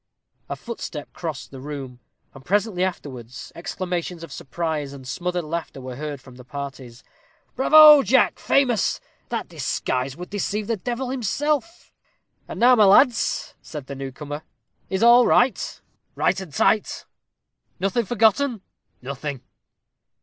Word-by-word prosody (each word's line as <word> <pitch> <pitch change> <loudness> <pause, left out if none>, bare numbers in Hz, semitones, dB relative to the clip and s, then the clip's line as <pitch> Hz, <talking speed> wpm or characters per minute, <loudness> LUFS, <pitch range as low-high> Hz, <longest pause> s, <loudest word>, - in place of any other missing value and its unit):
A - - -2
footstep 180 -10 -7
crossed 160 -5 -6
in - - -8
the 130 - -9
room, 135 -4 -7 0.3
and, 135 - -13
presently 200 +2 +1
afterwards, 130 -9 -5
exclamations 175 -1 -4
of 165 - -9
surprise 150 0 -4
and 135 -2 -11
smothered 180 +4 -2
laughter 160 -2 -5
were 130 -1 -7
heard 145 0 -5
from 130 -1 -15
the 125 - -12
parties. 135 -3 -8 0.5
"Bravo, 300 +2 +9
Jack! 260 +3 +3
famous! 250 -7 +2 0.3
that - - -3
disguise 130 +2 -2
would 180 +1 -8
deceive 205 +1 -2
the 230 - 0
devil 245 +5 -3
himself." 295 - -2 0.5
"And - - -7
now, 250 +2 +7
my 215 -3 +6
lads," 215 +4 +4
said 150 -4 -8
the 140 - -7
newcomer, 140 +2 -6 0.5
"is 190 +3 0
all 240 +1 +7
right?" 245 -3 +2 0.4
"Right - - +1
and 185 -5 -9
tight." 210 +8 +1 0.7
"Nothing 195 +5 0
forgotten?" 225 +2 +2 0.4
"Nothing." 140 0 -5
175 Hz, 135 wpm, -23 LUFS, 140-230 Hz, 0.7 s, Bravo